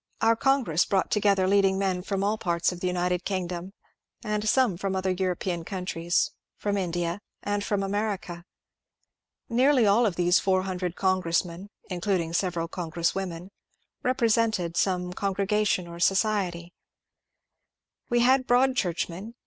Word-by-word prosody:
Our 230 Hz, 0 st, +4 dB
congress 235 Hz, -, +2 dB
brought 195 Hz, -2 st, 0 dB
together 200 Hz, -3 st, +3 dB
leading 195 Hz, -1 st, +3 dB
men 190 Hz, -2 st, 0 dB
from 195 Hz, +1 st, -2 dB
all 205 Hz, +2 st, +1 dB
parts 170 Hz, -4 st, 0 dB
of 180 Hz, -, -7 dB
the 180 Hz, -, -2 dB
United 180 Hz, 0 st, 0 dB
Kingdom, 180 Hz, -1 st, -3 dB, 0.5 s
and 210 Hz, -1 st, -1 dB
some 255 Hz, -7 st, +3 dB
from 195 Hz, +2 st, -3 dB
other 190 Hz, 0 st, 0 dB
European 180 Hz, -2 st, -2 dB
countries, 175 Hz, -2 st, -1 dB, 0.3 s
from 205 Hz, -1 st, -1 dB
India, 175 Hz, -1 st, -2 dB, 0.2 s
and 205 Hz, 0 st, -1 dB
from 200 Hz, -1 st, -1 dB
America. 195 Hz, -4 st, -3 dB, 1.0 s
Nearly 255 Hz, 0 st, +3 dB
all 215 Hz, +4 st, +4 dB
of 190 Hz, -, -2 dB
these 175 Hz, +1 st, +3 dB
400 185 Hz, -2 st, -1 dB
congressmen 185 Hz, 0 st, 0 dB, 0.2 s
(including 175 Hz, -2 st, -1 dB
several 170 Hz, -2 st, -1 dB
congresswomen) 170 Hz, +1 st, -3 dB, 0.5 s
repre 255 Hz, -1 st, +1 dB
sented 215 Hz, -7 st, +1 dB
some 180 Hz, -1 st, 0 dB
congregation 200 Hz, -1 st, 0 dB
or 170 Hz, 0 st, -9 dB
society. 185 Hz, -3 st, 0 dB, 1.4 s
We 240 Hz, 0 st, +3 dB
had 255 Hz, +1 st, +3 dB
Broadchurch 245 Hz, -8 st, +2 dB
men. 195 Hz, +7 st, -9 dB
190 Hz, 135 wpm, -26 LUFS, 175-210 Hz, 1.4 s, Our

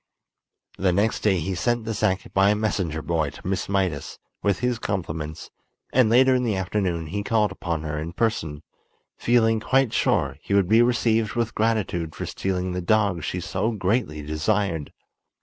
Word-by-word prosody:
The 95 Hz, -1 st, +3 dB
next 100 Hz, +5 st, +1 dB
day 100 Hz, -3 st, +2 dB
he 95 Hz, +4 st, -2 dB
sent 120 Hz, +5 st, 0 dB
the 115 Hz, -, -2 dB
sack 95 Hz, -2 st, -1 dB
by 95 Hz, +1 st, +4 dB
a 105 Hz, -, +3 dB
messenger 95 Hz, -7 st, -1 dB
boy 80 Hz, -3 st, 0 dB
to 70 Hz, -, -14 dB
Miss 95 Hz, -1 st, -2 dB
Mydas, 95 Hz, -7 st, -1 dB, 0.2 s
with 100 Hz, -2 st, +1 dB
his 125 Hz, +2 st, -1 dB
compliments, 80 Hz, -6 st, -4 dB, 0.4 s
and 125 Hz, -3 st, +4 dB
later 130 Hz, +3 st, +5 dB
in 125 Hz, 0 st, +2 dB
the 110 Hz, -4 st, 0 dB
afternoon 95 Hz, -3 st, -1 dB
he 100 Hz, +7 st, -3 dB
called 105 Hz, -1 st, +1 dB
upon 85 Hz, -4 st, -3 dB
her 75 Hz, -1 st, -3 dB
in 80 Hz, +2 st, -5 dB
person, 80 Hz, -10 st, -1 dB, 0.5 s
feeling 115 Hz, -2 st, +3 dB
quite 135 Hz, +2 st, +2 dB
sure -, -, +1 dB
he 100 Hz, -, -1 dB
would 100 Hz, -3 st, +3 dB
be 110 Hz, +4 st, +5 dB
received 115 Hz, -2 st, +2 dB
with 115 Hz, -1 st, -1 dB
gratitude 100 Hz, -8 st, -1 dB
for -, -, -4 dB
stealing 95 Hz, -1 st, -2 dB
the 90 Hz, 0 st, -2 dB
dog 100 Hz, -3 st, +1 dB
she 90 Hz, -, -2 dB
so 95 Hz, +5 st, -1 dB
greatly 95 Hz, -6 st, -1 dB
desired. 80 Hz, +1 st, -1 dB
95 Hz, 175 wpm, -24 LUFS, 85-110 Hz, 0.5 s, later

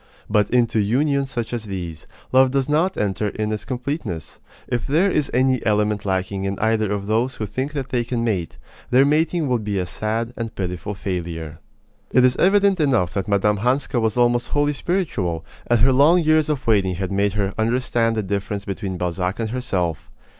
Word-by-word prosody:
But 105 Hz, -1 st, +2 dB
into 120 Hz, -2 st, +2 dB
unions 135 Hz, +6 st, +1 dB
such 120 Hz, -2 st, -4 dB
as 115 Hz, -2 st, -3 dB
these, 85 Hz, -6 st, -6 dB, 0.2 s
love 130 Hz, 0 st, +5 dB
does 135 Hz, 0 st, 0 dB
not 160 Hz, +6 st, +1 dB
enter 105 Hz, +1 st, -1 dB
in 105 Hz, +1 st, -2 dB
its 110 Hz, -, -4 dB
completeness. 125 Hz, -, -4 dB, 0.3 s
If 120 Hz, -, -2 dB
there 170 Hz, +8 st, +3 dB
is 150 Hz, -5 st, 0 dB
any 130 Hz, 0 st, +2 dB
element 105 Hz, -1 st, +1 dB
lacking 95 Hz, +1 st, -1 dB
in 100 Hz, 0 st, -2 dB
either 110 Hz, -2 st, +1 dB
of 100 Hz, -1 st, -2 dB
those 115 Hz, +5 st, 0 dB
who 110 Hz, -, -3 dB
think 130 Hz, +8 st, -4 dB
that 135 Hz, -3 st, -4 dB
they 125 Hz, -2 st, 0 dB
can 120 Hz, 0 st, -2 dB
mate, 95 Hz, -8 st, -2 dB, 0.3 s
their 130 Hz, +2 st, +5 dB
mating 155 Hz, +2 st, +1 dB
will 125 Hz, -2 st, +1 dB
be 105 Hz, -2 st, -3 dB
a 90 Hz, -, 0 dB
sad 115 Hz, +5 st, -3 dB
and 115 Hz, -1 st, -5 dB
pitiful 90 Hz, +2 st, -4 dB
failure. 85 Hz, -5 st, -5 dB, 0.5 s
It 130 Hz, -1 st, +5 dB
is 125 Hz, 0 st, +3 dB
evident 195 Hz, 0 st, +4 dB
enough 125 Hz, -, +2 dB
that 95 Hz, -2 st, -2 dB
Mme. 105 Hz, +1 st, +2 dB
Hanska 125 Hz, +2 st, 0 dB
was 110 Hz, 0 st, 0 dB
almost 120 Hz, 0 st, +2 dB
wholly 145 Hz, 0 st, +1 dB
spiritual, 135 Hz, -, -2 dB, 0.2 s
and 120 Hz, -2 st, +3 dB
her 130 Hz, +2 st, +5 dB
long 160 Hz, +7 st, +5 dB
years 155 Hz, 0 st, +3 dB
of 150 Hz, -3 st, -2 dB
waiting 100 Hz, -5 st, +2 dB
had 95 Hz, +1 st, -3 dB
made 100 Hz, 0 st, +1 dB
her 100 Hz, -2 st, -1 dB
understand 115 Hz, 0 st, +1 dB
the 110 Hz, -, -1 dB
difference 100 Hz, +1 st, -3 dB
between 95 Hz, -1 st, -4 dB
Balzac 90 Hz, +3 st, -2 dB
and 110 Hz, -1 st, -2 dB
herself. 95 Hz, -, -2 dB
115 Hz, 190 wpm, -22 LUFS, 100-130 Hz, 0.5 s, love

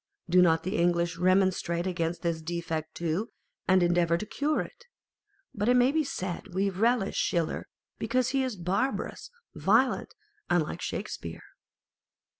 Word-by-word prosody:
Do 180 Hz, +1 st, +5 dB
not 165 Hz, -2 st, +4 dB
the 190 Hz, +5 st, -2 dB
English 170 Hz, 0 st, +1 dB
remonstrate 185 Hz, -2 st, +2 dB
against 170 Hz, -2 st, -2 dB
this 165 Hz, -2 st, -1 dB
defect 160 Hz, -1 st, -4 dB
too, 170 Hz, +6 st, -1 dB, 0.4 s
and 185 Hz, -1 st, +5 dB
endeavour 175 Hz, -1 st, +3 dB
to 215 Hz, -, -5 dB
cure 290 Hz, +7 st, 0 dB
it? 480 Hz, -, -10 dB, 0.7 s
But 210 Hz, +2 st, 0 dB
it 250 Hz, -, +5 dB
may 250 Hz, +2 st, +5 dB
be 315 Hz, +1 st, +2 dB
said 185 Hz, -, -5 dB
we 195 Hz, +1 st, +1 dB
relish 220 Hz, +1 st, +1 dB
Schiller 170 Hz, -3 st, 0 dB, 0.3 s
because 255 Hz, -1 st, +1 dB
he 270 Hz, 0 st, +1 dB
is 255 Hz, -4 st, -2 dB
barbarous, 195 Hz, +9 st, -2 dB, 0.2 s
violent, -, -, +2 dB, 0.3 s
and 175 Hz, -2 st, +3 dB
like 150 Hz, -, -6 dB
Shakespeare. 85 Hz, -1 st, -5 dB
180 Hz, 145 wpm, -28 LUFS, 170-215 Hz, 0.7 s, Do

